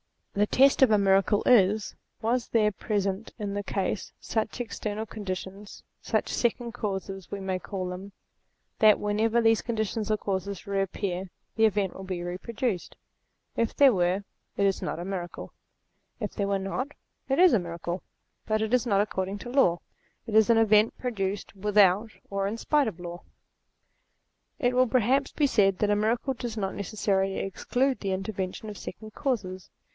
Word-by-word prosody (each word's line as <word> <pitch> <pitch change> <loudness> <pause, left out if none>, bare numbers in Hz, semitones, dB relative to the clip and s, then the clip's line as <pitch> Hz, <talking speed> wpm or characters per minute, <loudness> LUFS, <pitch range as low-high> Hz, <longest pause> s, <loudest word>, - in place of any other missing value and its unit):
The 205 0 +2
test 275 +4 +4
of 265 - +7
a 215 - +5
miracle 195 +1 +3
is: 215 -3 +4 0.3
Were 235 +3 +2
there 215 -2 +3
present 200 0 -2
in 205 -3 -3
the 205 - -1
case 195 0 -2
such 220 +2 -2
ex 240 -2 -5
ternal 215 +1 -3
conditions, 195 -1 -6 0.2
such - - -1
second 240 0 0
causes 195 -4 -4
we 200 - -5
may 190 -1 -2
call 185 -1 -4
them, 190 +2 -7 0.7
that 215 -1 +7
whenever 220 +3 +1
these 225 -1 +4
conditions 220 -2 -2
or 215 - +2
causes 195 -1 -3
re 200 -1 0
appear 190 -1 -3 0.3
the 225 - +4
event 200 -3 +1
will 190 - -9
be 185 -2 -4
reproduced? 190 +3 -3 0.6
If 230 -1 0
there 275 -3 +6
were, 180 +1 +1 0.3
it 200 - +3
is 195 -1 +1
not - - -3
a 175 - -5
miracle; 185 -3 -5 0.7
if 210 -4 -4
there 200 - -1
were 200 0 +1
not, 250 +9 -3 0.4
it 270 - +2
is 365 -1 +7
a 225 - +5
miracle, 170 +1 -4 0.5
but 215 0 +1
it 220 +2 -1
is 250 -1 +3
not 200 -3 +3
according 195 -1 -2
to 240 - -8
law: 240 -10 +3 0.4
it 225 - -6
is 220 +1 +5
an 230 - +6
event 220 0 +4
produced, 200 -5 -3
without, 205 +1 +4 0.2
or 195 0 -1
in 215 +3 -3
spite 295 +3 +2
of 185 -5 -5
law. 175 0 -7 1.4
It 250 -5 +1
will 255 0 +4
perhaps 255 +3 +2
be 295 - +1
said 195 -8 +3
that 210 -1 +2
a - - +4
miracle 230 +5 0
does 235 -2 -5
not 195 -2 -2
necessarily 195 -1 0
exclude 250 +7 0
the 195 -2 -2
intervention 190 +1 -4
of 205 - -8
second 215 +5 -8
causes. 200 -10 -3
205 Hz, 175 wpm, -27 LUFS, 195-225 Hz, 1.4 s, of